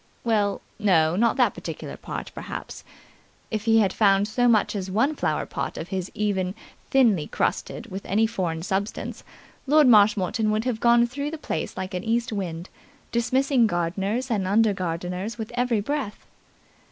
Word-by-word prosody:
Well, 210 -4 +1 0.2
no, 170 -6 +3
not 230 +4 +2
that - - +3
particular - - -7
part, - - -7
perhaps. - - -7 0.7
If 215 -1 -2
he 225 0 +5
had 195 - +1
found 200 -1 +3
so 245 +3 +1
much 220 -2 +3
as 190 -2 -3
one 235 +11 +1
flower - - -1
pot - - -4
of 165 - -6
his 190 -1 -3
even 195 -3 -1 0.3
thinly 225 - +3
crusted - - -2
with 195 +2 -5
any 215 +3 +3
foreign 180 -7 -2
substance, 195 +3 -3 0.4
Lord 300 +2 +6
Marshmoreton 210 -1 +4
would 215 +2 0
have 245 -4 -1
gone 235 0 +5
through 280 +4 -4
the 320 - -5
place 160 - -4
like 185 0 -4
an 180 0 -3
east 230 +1 0
wind, 175 -3 -4 0.4
dismissing 255 +1 +2
gardeners 195 +8 -1
and 200 -4 0
under 215 +2 +3
gardeners 180 +4 -4
with 220 -1 -6
every 245 -3 +1
breath. 270 -2 -4
210 Hz, 165 wpm, -25 LUFS, 190-235 Hz, 0.7 s, Lord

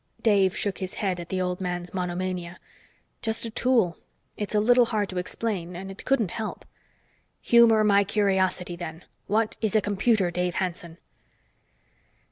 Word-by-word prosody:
Dave 195 -4 +3
shook 200 -2 -2
his 185 -1 -5
head 190 -4 -1
at 170 - -8
the 190 - -1
old 180 0 -2
man's 175 -1 -4
monomania. 180 -1 -3 0.6
"Just 225 +1 -1
a 230 - -5
tool. 225 -8 +2 0.4
It's 210 0 -4
a - - +5
little 245 +3 +5
hard 215 -3 -1
to 185 - -3
explain, 180 -2 -3
and 190 +2 -6
it 195 - -10
couldn't 230 -9 +1
help." 220 -1 -5 0.8
"Humor 230 -2 +5
my 200 -1 +5
curiosity, 190 -3 0
then. 170 -1 -8 0.2
What 215 +2 0
is 220 -2 0
a - - +6
computer, 205 -2 +1
Dave 180 0 -1
Hanson?" 170 -2 -3
190 Hz, 155 wpm, -26 LUFS, 180-215 Hz, 0.8 s, a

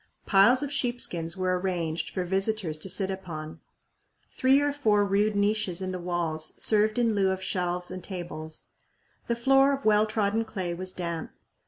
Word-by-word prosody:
Piles 215 +8 +5
of 285 0 -3
sheep 245 -3 -1
skins 165 -2 -2
were 185 -1 0
arranged 170 -3 -2
for 185 - -3
visitors 190 -3 -1
to 190 - -3
sit 195 +1 -1
upon. 165 -5 -7 0.7
Three 265 +1 +4
or 290 0 +1
four 215 -8 +2
rude 205 +2 +1
niches 200 -3 +1
in 185 -1 -3
the 185 - -4
walls 170 -3 -2
served 215 +1 +3
in 235 -2 +2
lieu 195 -2 +2
of 190 0 -2
shelves 180 -1 -2
and 185 - -6
tables. 170 -4 -6 0.6
The 235 - +1
floor 270 +3 +4
of 275 0 -4
well 215 0 +4
trodden 215 +1 0
clay 190 -6 -4
was 185 +2 -5
damp. 170 -3 -4
195 Hz, 175 wpm, -27 LUFS, 175-220 Hz, 0.7 s, Piles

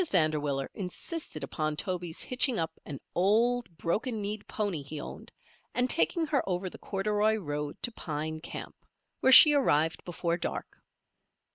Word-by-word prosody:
Vanderwiller 150 -5 +1
insisted 190 - -5
upon 155 +2 -2
Toby's 175 0 -2
hitching 250 -1 +2
up 165 -1 -1 0.2
an 140 -3 -6
old, 230 +6 +2
broken 220 +8 -1
kneed 205 +1 -4
pony 200 -8 -2
he 145 +2 -7
owned, - - -9 0.4
and 250 0 +2
taking 335 +3 +2
her 300 -3 +1
over 180 0 -2
the - - -12
corduroy 210 +2 +1
road 150 -7 -4
to 240 - 0
Pine 155 -5 -4
Camp, - - -7 0.5
where 260 - +4
she 295 +3 +10
arrived 165 - +2
before 170 -1 -2
dark. - - -5
185 Hz, 145 wpm, -29 LUFS, 155-230 Hz, 0.5 s, she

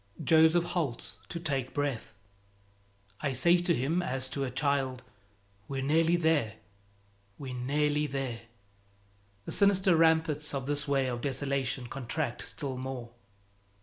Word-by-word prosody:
Joseph 160 +1 +5
halts 165 -8 -3
to 170 - -4
take 135 -6 -3
breath. 145 -5 -2 1.0
I 140 -3 -1
say 170 +8 +5
to 175 -1 +1
him 145 +8 0
as 130 -5 -2
to 140 - -2
a 135 - -2
child, 135 -1 0 0.6
"We're 135 -1 -3
nearly 165 +4 +3
there, 160 -10 +1 0.8
we're 135 -2 -6
nearly 150 +4 0
there." 135 -4 -4 1.0
The - - -5
sinister 195 -3 +4
ramparts 160 -2 +2
of 135 -2 -3
this 145 +1 0
way 135 -1 +2
of 120 -2 -3
desolation 135 -1 -1
contract 125 +1 -3
still 135 -3 -5
more. 130 -2 -6
140 Hz, 130 wpm, -30 LUFS, 130-160 Hz, 1.0 s, Joseph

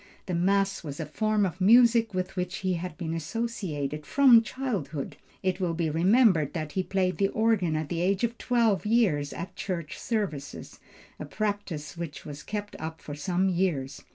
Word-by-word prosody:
The 185 - -3
mass 195 +3 +1
was 145 -2 -6
a 160 - -2
form 215 +6 +1
of 185 0 -5
music 230 +2 +6
with 185 0 -3
which 180 0 -2
he 185 - +2
had 175 -1 -5
been 165 -3 -3
associated 160 -5 -3
from 255 - +6
childhood. 205 - -4 0.3
It 185 0 0
will 175 -3 -1
be 160 -2 0
remembered 185 - +4
that 155 -4 -4
he 190 - 0
played 185 -1 -1
the 195 - +4
organ 205 -7 +1
at 155 -1 -2
the 170 -1 -2
age 195 +4 +1
of 235 0 0
twelve 230 -6 +2
years 210 -11 +2
at 170 - -7
church 170 -6 -4
services, 150 - -4 0.4
a - - -5
practice 185 -5 -3
which 165 -4 -6
was 145 -1 -7
kept 205 0 -5
up 160 0 -6
for 145 - -8
some 180 +6 0
years. 170 -7 -1
185 Hz, 180 wpm, -27 LUFS, 155-210 Hz, 0.4 s, music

